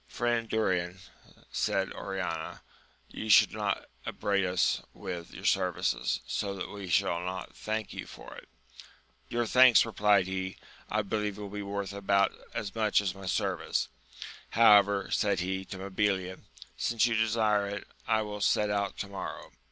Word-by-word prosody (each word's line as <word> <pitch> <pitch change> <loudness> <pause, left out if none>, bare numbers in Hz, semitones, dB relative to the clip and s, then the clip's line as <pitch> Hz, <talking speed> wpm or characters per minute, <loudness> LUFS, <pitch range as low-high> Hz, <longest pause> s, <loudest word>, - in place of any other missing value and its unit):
Friend 120 -2 -1
Durin, 90 -4 0 0.5
said - - 0
Oriana, 90 -5 -4 0.5
you 110 - -6
should 105 - +7
not - - -1 0.2
upbraid 100 -1 0
us 90 -1 +1
with 85 -2 -6
your - - -9
services, - - +1
so 100 -1 -2
that 95 - -5
we 100 -2 -7
shall 85 -1 +2
not 95 +1 -5
thank 110 -1 -3
you - - -6
for - - -11
it. - - -13 0.8
Your 120 0 0
thanks, 125 +1 +7
replied 105 -4 +3
he, 95 0 -4 0.3
I 105 0 0
believe 105 0 -2
will 105 -1 -6
be 105 +1 -5
worth 100 0 -4
about 100 0 +2 0.2
as 100 - -4
much 110 -2 +3
as 100 -3 -1
my 95 -1 -9
service! 90 - -1 0.6
however, 100 -3 +5
said 100 -3 +1
he 95 +1 -2
to 95 - -7
Mabilia, 95 -1 -1 0.4
since 115 -1 +1
you 120 - +1
desire 110 -2 +2
it, 100 0 -5 0.2
I 110 -1 +2
will 105 -1 -6
set 105 +1 +2
out 100 -1 -1
to 100 - -5
morrow. 100 -1 -7
100 Hz, 155 wpm, -30 LUFS, 95-105 Hz, 0.8 s, should